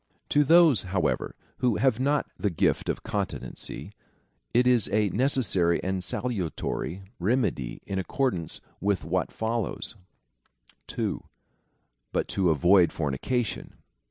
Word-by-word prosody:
To 145 - +4
those, 160 -4 +6
however, 95 -1 -1 0.3
Avho 125 -4 +2
have 130 -4 +2
not 140 +2 +2
the 105 - 0
gift 85 - +1
of - - -2
continency, 105 -4 -4 0.6
it 125 +1 +3
is 125 -4 +4
a 105 -1 +2
necessary 105 -9 +2
and 95 0 -2
salutary 95 -4 -3 0.2
remedy 95 - -1
in 95 -1 -2
accordance 95 - -1 0.2
Avith 100 -1 +1
what 85 +2 -1
follows. 110 0 -3 0.9
2. - - -3 0.9
But - - -1
to 95 -3 +2
avoid 85 +4 +5
fornication. 85 - -2
100 Hz, 115 wpm, -27 LUFS, 90-125 Hz, 0.9 s, those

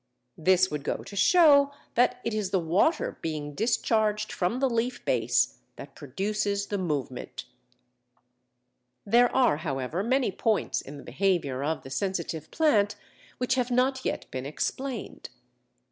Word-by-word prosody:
This 185 +2 +3
would 150 -1 -3
go - - -3
to 200 - -10
show 285 - +5 0.2
that 250 +1 +2
it 230 - -2
is 210 -3 -1
the 195 - +1
water 180 - +1
being 150 -2 -4
discharged 215 - 0
from 180 +7 -1
the 270 +1 +2
leaf 240 +1 -2
base - - +1 0.2
that - - -11
produces 200 0 -2
the 205 -1 -3
movement. 140 -8 -4 1.6
There 240 +4 +4
are, 250 - +3
however, 145 +2 -3
many 255 +1 +1
points 215 +3 0
in 145 +1 -10
the 140 - -11
behaviour 140 -3 0
of 160 +2 -2
the 135 - -10
Sensitive 170 -2 -3
Plant 215 -11 +2 0.4
which 255 0 0
have 250 -1 0
not 260 +2 +1
yet - - -2
been 130 +1 -4
explained. 260 - -4
200 Hz, 145 wpm, -27 LUFS, 160-245 Hz, 1.6 s, show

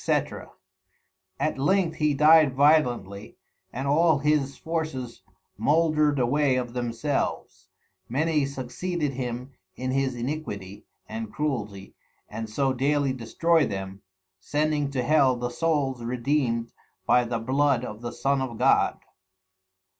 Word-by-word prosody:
_ - - -2 0.9
At 155 -3 -1
length 170 +2 +1
he 150 -2 +1
died 150 -1 +6
violently, 125 -9 +2 0.3
and 130 +3 -4
all 160 +2 +4
his 145 -1 0
Forces 155 -7 -4 0.4
moldred 155 -2 +2
away 135 +2 +2
of 125 -2 -3
themselves, 125 +3 -3 0.4
many 150 +4 +1
succeeded 145 +4 -3
him 125 0 -5 0.2
in 130 0 -3
his 135 -1 0
iniquity 120 -7 -5 0.2
and 110 -1 -6
cruelty 105 -10 -4 0.3
and 110 +1 -6
so 135 +4 0
dayly 140 +1 +1
destroy 150 +6 +1
them, 95 0 -6 0.4
sending 150 +4 0
to 130 -3 -2
Hell 135 -2 +4
the 120 0 -3
Souls 135 -3 -1
redeemed 120 -1 -1 0.3
by 125 - +4
the 120 0 -2
blood 130 +2 +1
of 105 -1 -8
the 120 0 -5
Son 140 0 0
of 125 -4 -4
God. - - +3
135 Hz, 125 wpm, -26 LUFS, 120-150 Hz, 0.9 s, died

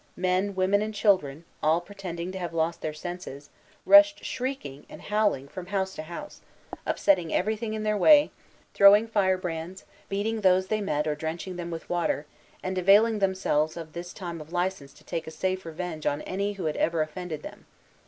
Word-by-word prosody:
Men, 185 +2 0
women, 190 +2 +2
and 215 0 -3
children, 170 -8 +1 0.2
all 160 +2 +3
pretending 180 -2 -6
to 190 - -6
have 170 -2 -5
lost 165 +1 0
their 155 - -2
senses, 155 -3 -8 0.3
rushed 300 0 +7
shrieking 245 - -4
and - - -10
howling 210 -10 0
from 180 +5 -8
house 190 -1 -1
to - - -6
house, 170 +2 -9 0.5
upsetting 180 -5 +2
everything 220 +3 -1
in 215 - -4
their 215 0 +1
way, 295 +7 +6 0.4
throwing 205 +3 +7
firebrands, 185 -4 -1 0.2
beating 215 +3 -1
those 185 -1 +3
they 215 -1 0
met 150 -7 -1
or 155 - 0
drenching 160 +4 -5
them 175 -1 -5
with 165 -1 -6
water, 170 -4 -1 0.4
and 185 0 -2
availing 210 +4 +5
themselves 185 -6 0
of 160 -2 -8
this 175 +1 -6
time 170 -4 -6
of 155 +2 -12
license 175 -5 -2
to - - -20
take 165 -1 -4
a - - -3
safe 185 +2 -3
revenge 165 -1 -5
on 145 +1 -1
any 200 +2 -2
who 190 -4 -6
had 155 - -1
ever 165 -1 +1
offended 160 0 -6
them. - - -11
185 Hz, 185 wpm, -27 LUFS, 165-200 Hz, 0.5 s, rushed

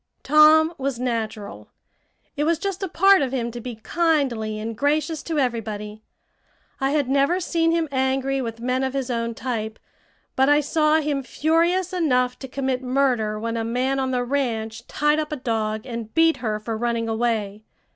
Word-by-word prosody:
Tom 310 +3 +6
was 270 -2 -2
natural. 225 -4 -4 0.7
It 295 - 0
was 330 +2 +2
just 395 +2 -4
a 385 - -1
part 390 +1 +5
of 265 -3 -1
him 240 -3 -2
to 240 +1 -7
be 245 0 -6
kindly 250 -5 0
and 220 +1 -5
gracious 300 +3 0
to 325 -2 -3
everybody. 215 -5 -2 0.8
I 270 - +1
had 290 -2 +1
never 280 +7 +2
seen 330 -2 +1
him 330 -1 +1
angry 265 0 0
with 230 -2 -5
men 255 +2 0
of 265 0 -2
his 265 -2 -2
own 230 -1 -2
type, 225 -3 -4 0.6
but 265 +1 +3
I 290 0 +5
saw 305 +1 +2
him 290 -2 -1
furious 335 +7 +1
enough 250 -8 +1
to 265 - -7
commit 265 -1 -2
murder 250 -5 0
when 230 +1 -3
a 225 - -1
man 255 +4 0
on 265 -1 0
the 250 -1 0
ranch 230 -4 -2
tied 295 +1 +1
up 305 -1 -3
a - - -1
dog 220 -4 -2
and 230 -3 -6
beat 325 0 +4
her 215 -3 -2
for 225 +1 -4
running 230 0 -1
away. 220 -2 -1
260 Hz, 180 wpm, -23 LUFS, 230-300 Hz, 0.8 s, Tom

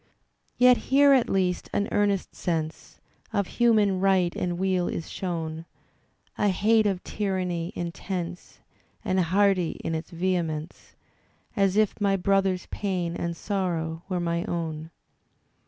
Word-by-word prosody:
Yet 250 0 +6
here 280 +1 +6
at 255 -3 +3
least 185 -2 0
an 205 - +1
earnest 200 -2 +1
sense 160 -2 -4 0.3
Of 200 -1 0 0.2
human 210 -5 +4
right 185 -2 +2
and 175 -1 -2
weal 185 -1 +1
is 165 - -4
shown; 165 -3 -4 0.7
A 210 - +3
hate 215 +3 +3
of 190 -2 -2
tyranny 185 -4 -2
intense. 175 0 -5 0.4
And 185 - +1
hearty 185 0 +2
in 165 - -2
its 160 +1 -4
vehemence. 170 -3 -3 0.6
As 195 -2 +2
if 215 0 +1
my 200 -1 +3
brother's 195 0 +1
pain 180 -4 -2
and 170 -1 -3
sorrow 170 -5 -2
were 185 -2 -1
my 170 0 -1
own. 160 -4 -4
185 Hz, 130 wpm, -26 LUFS, 170-200 Hz, 0.7 s, Yet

